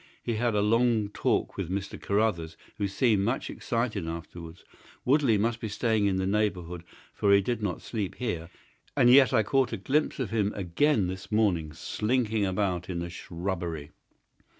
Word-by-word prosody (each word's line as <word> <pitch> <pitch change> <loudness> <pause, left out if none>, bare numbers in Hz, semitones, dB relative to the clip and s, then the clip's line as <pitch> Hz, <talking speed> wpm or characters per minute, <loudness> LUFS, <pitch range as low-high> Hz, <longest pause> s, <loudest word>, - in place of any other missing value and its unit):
He 120 - -1
had 120 -1 +1
a 105 - +3
long 115 -1 +2
talk - - -1
with - - -3
Mr. 100 +1 -4
Carruthers, 100 -6 0 0.2
who 100 - +1
seemed 105 0 +2
much 120 +6 -1
excited 115 -7 -2
afterwards. 85 0 -8 0.4
Woodley 130 -4 +4
must 115 +3 0
be 110 - -4
staying 110 0 +1
in 95 - +1
the 95 0 0
neighbourhood, 95 -4 -1 0.3
for 100 - +2
he 100 - +7
did 115 +3 -2
not 100 -4 -3
sleep 105 -6 -3
here, 90 -9 -3 0.5
and 120 - +6
yet 130 -2 +7
I 110 - +3
caught 135 +4 +1
a - - -1
glimpse 150 +3 0
of 125 -7 -2
him 105 -2 +1
again 100 - +1
this 95 +3 -6
morning 95 -8 +1
slinking 110 +3 0
about 95 -2 -1
in 90 - -3
the 85 0 -4
shrubbery. 85 -4 -4
105 Hz, 175 wpm, -28 LUFS, 90-115 Hz, 0.5 s, he